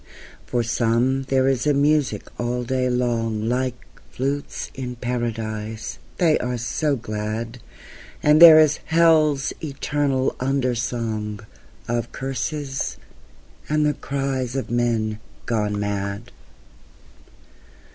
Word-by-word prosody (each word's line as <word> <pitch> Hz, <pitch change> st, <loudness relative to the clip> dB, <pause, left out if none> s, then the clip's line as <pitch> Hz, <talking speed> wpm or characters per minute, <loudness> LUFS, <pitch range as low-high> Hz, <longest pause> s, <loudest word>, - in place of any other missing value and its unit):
For 120 Hz, -1 st, 0 dB
some 120 Hz, +3 st, +1 dB
there 130 Hz, -1 st, +3 dB
is 135 Hz, +1 st, +1 dB
a 145 Hz, -, +3 dB
music 145 Hz, -6 st, +2 dB, 0.2 s
all 125 Hz, +1 st, -1 dB
day 130 Hz, +1 st, 0 dB
long 115 Hz, -3 st, 0 dB
Like 125 Hz, 0 st, -1 dB, 0.3 s
flutes 140 Hz, +2 st, -3 dB
in 125 Hz, -2 st, -5 dB
Paradise, 115 Hz, -3 st, -4 dB, 0.2 s
they 165 Hz, -3 st, +3 dB
are 125 Hz, 0 st, -2 dB
so 140 Hz, +5 st, 0 dB
glad; 110 Hz, +1 st, -4 dB, 0.6 s
And 150 Hz, +2 st, +5 dB
there 165 Hz, -2 st, +11 dB
is 155 Hz, -1 st, +4 dB
hell's 155 Hz, -4 st, +3 dB
eternal 140 Hz, -2 st, -1 dB
under 130 Hz, -1 st, +1 dB
song 110 Hz, -3 st, -3 dB, 0.5 s
Of 120 Hz, 0 st, -2 dB
curses 135 Hz, +1 st, -3 dB, 0.7 s
and 150 Hz, 0 st, +2 dB
the 150 Hz, -, +2 dB
cries 135 Hz, -3 st, -3 dB
of 135 Hz, -, -3 dB
men 115 Hz, -3 st, 0 dB, 0.3 s
gone 105 Hz, -3 st, -1 dB
mad. 100 Hz, +2 st, -3 dB
125 Hz, 110 wpm, -23 LUFS, 115-140 Hz, 0.7 s, there